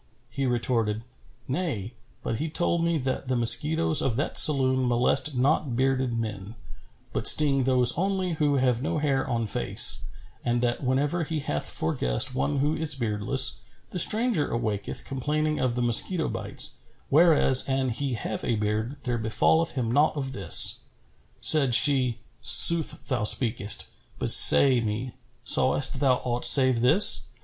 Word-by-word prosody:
He 135 +1 -4
retorted, 115 -3 -3 0.4
"Nay; 130 - -5 0.3
but 115 - -5
he 155 - -5
told 170 +1 -1
me 170 -1 -1
that 130 -1 -5
the 130 - -2
mosquitoes 145 +7 +2
of 125 -4 -2
that 140 - 0
saloon 130 -4 +2
molest 125 +4 -1
not 135 0 -1
bearded 130 -1 -2
men, 105 -1 -7 0.6
but - - -1
sting 140 -4 +3
those 125 -2 +2
only 190 0 -3
who 150 -3 -2
have 125 -3 -1
no 145 - -4
hair 140 -3 -3
on 115 -2 -3
face, 105 - 0 0.4
and 120 0 -2
that 120 +3 -3
whenever 145 +6 -2
he 160 0 -5
hath 75 - -5
for 80 - -3
guest 115 - -2
one 140 +3 -3
who 145 +3 -2
is 155 -2 -2
beardless, 120 +2 -1 0.3
the 180 - -4
stranger 220 -4 +1
awaketh 105 -3 -5
complaining 150 +3 -4
of 125 -2 -3
the 125 - -3
mosquito 155 - +1
bites; - - -3 0.3
whereas 150 -4 +3
an 135 -1 -2
he 130 +2 -5
have 110 - -7
a 120 - -2
beard, 110 +5 -4
there 120 -2 -4
befalleth 160 +9 -1
him 120 -4 -4
naught 150 +4 0
of 135 -2 -6
this." 100 -5 +4 0.6
Said 140 -6 +3
she, 130 -3 +2 0.2
"Sooth 150 +7 +5
thou 125 -5 -3
speakest: 110 -2 0 0.3
but - - -2
say 130 -3 +6
me, 115 +3 -6 0.3
sawest 135 -1 +1
thou 135 -3 +1
aught 120 -1 -5
save 130 -4 +5
this?" 155 - +4
130 Hz, 155 wpm, -24 LUFS, 120-150 Hz, 0.6 s, say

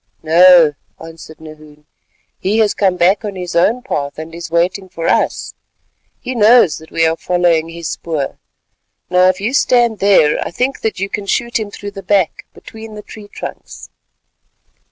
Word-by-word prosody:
"No," 170 -1 +6 0.3
answered 160 -1 -12
Nahoon, 155 -1 -14 0.5
"he 200 +4 -1
has 215 -2 +2
come 190 -3 +1
back 190 +5 +2
on 205 -2 -5
his 180 -1 -6
own 220 +9 +2
path 140 - -4
and 160 +1 -8
is 170 0 -8
waiting 180 +3 -1
for 165 -1 -5
us. - - 0 0.7
He 255 - -5
knows 225 -6 +4
that 160 - -15
we 165 - +1
are 160 0 +1
following 170 -2 0
his 165 -1 -7
spoor. 155 -5 -4 0.7
Now 180 0 +4
if 185 0 +1
you 215 +6 -2
stand 240 -5 +2
there, 190 -7 +3
I - - -5
think 255 +9 -2
that 220 -3 -3
you 195 - -2
can 200 0 -5
shoot 235 +3 -1
him 215 -2 -5
through 205 0 -8
the 195 - -9
back 190 -2 0
between 220 -1 -12
the 210 - -9
tree 210 -2 -12
trunks." - - -10
185 Hz, 175 wpm, -16 LUFS, 165-210 Hz, 0.7 s, No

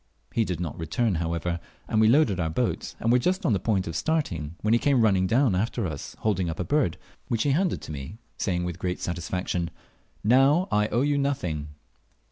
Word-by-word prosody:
He 115 - +2
did 90 -4 -3
not 85 -4 -4
return, 95 +7 0
however, 85 +1 -2 0.3
and 110 - +2
we 110 - +6
loaded 115 - +4
our 80 -2 0
boat, 80 - -2
and 115 - +1
were 125 - +5
just 185 - 0
on 130 - +3
the 95 - +1
point 95 -2 0
of 80 - -5
starting, 85 - -1
when 110 +1 +2
he 120 - +4
came 140 -2 +3
running 95 -4 +3
down 120 +2 +3
after 110 +3 0
us 75 -5 -6
holding 95 -5 +1
up 80 - -5
a - - 0
bird, 145 - +1 0.3
which 115 -2 0
he 145 - +2
handed 175 +5 +1
to - - -7
me, 70 +7 -7 0.2
saying 90 -3 -1
with 90 0 -4
great 90 -1 -2
satisfaction, 85 0 -2 0.5
"Now 135 - +4
I 105 0 +3
owe 120 +4 +1
you 145 0 +2
nothing." 80 - -2
100 Hz, 210 wpm, -26 LUFS, 85-125 Hz, 0.5 s, we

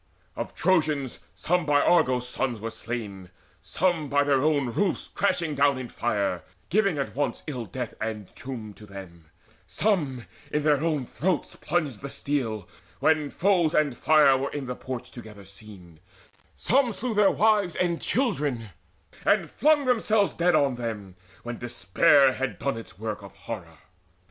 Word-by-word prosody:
Of - - -5
Trojans 155 -7 +1 0.2
some 180 +1 +1
by 145 -1 +3
Argos' 125 -7 +3
sons 125 -2 -2
were 115 +2 -5
slain, 105 -6 -6 0.3
Some 165 -5 0
by 145 +1 +3
their 140 -2 +2
own 145 -4 +1
roofs 195 - 0
crashing 175 -6 0
down 140 -1 +3
in 125 -2 -6
fire, 100 -6 -1 0.3
Giving 195 -4 +2
at 140 - -3
once 145 0 -2
in 125 -6 -4
death 120 +4 -5
and 110 -3 -5
tomb 115 -5 -7
to 105 - -13
them: 95 -4 -11 0.4
Some 135 - 0 0.2
in 150 - -1
their 150 -1 +3
own 155 -5 0
throats 170 +6 -2
plunged 150 -9 -2
the 140 - -6
steel, 125 -8 -2 0.3
when 155 -2 +2
foes 175 -3 +2
And 145 -5 +2
fire 150 -2 +5
were 135 +1 -1
in 145 -2 -5
the 125 0 -4
porch 130 -1 -6
together 105 -4 -11
seen: 95 -4 -13 0.6
Some 255 -2 +2
slew 235 +4 -2
their 205 -2 +5
wives 210 -5 +2
and 175 -2 0
children, 145 - -1 0.5
and - - +2
flung 295 -1 +3
themselves 220 -4 +2
Dead 175 0 +2
on 140 -4 +2
them, 105 -6 -5 0.3
when 120 0 -6
despair 120 +5 +4
had 135 0 -3
done 140 -2 -1
its 115 -4 -10
work 105 0 -4
Of 100 0 -12
horror. 95 -5 -8
135 Hz, 160 wpm, -26 LUFS, 115-165 Hz, 0.6 s, fire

